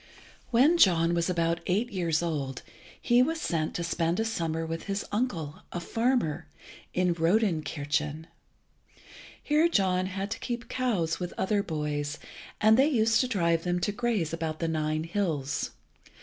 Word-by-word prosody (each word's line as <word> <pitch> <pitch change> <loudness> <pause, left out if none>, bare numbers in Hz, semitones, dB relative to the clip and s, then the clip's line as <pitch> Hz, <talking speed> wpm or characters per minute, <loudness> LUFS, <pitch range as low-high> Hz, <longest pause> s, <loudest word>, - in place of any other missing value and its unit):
When 280 +8 +4
John 170 - +5
was 170 +1 0
about 170 -1 +1
eight 210 +7 0
years 170 -4 0
old 140 -6 -3 0.4
he 240 +1 +4
was 320 +5 +1
sent 160 - -1
to 170 - -2
spend 170 +1 0
a 225 - +1
summer 165 -7 -2
with 165 0 -5
his 200 0 -2
uncle, 175 - -2
a 175 - -3
farmer, 175 - 0 0.4
in 180 -1 +1
Rodenkirchen. 160 -4 0 1.2
Here 305 +2 +3
John 185 - +2
had 195 +2 -4
to - - -3
keep 240 -1 -4
cows 205 -11 0
with 180 -1 -5
other 205 +1 +1
boys, 150 -3 -3 0.4
and 220 +1 +5
they 275 - +6
used 225 -5 +3
to 255 - 0
drive 170 -8 +1
them 180 0 0
to 205 - 0
graze 210 -7 -1
about 160 -1 -3
the 165 - -2
Nine 155 -1 -1
hills. 165 -6 -1
175 Hz, 155 wpm, -28 LUFS, 160-220 Hz, 1.2 s, they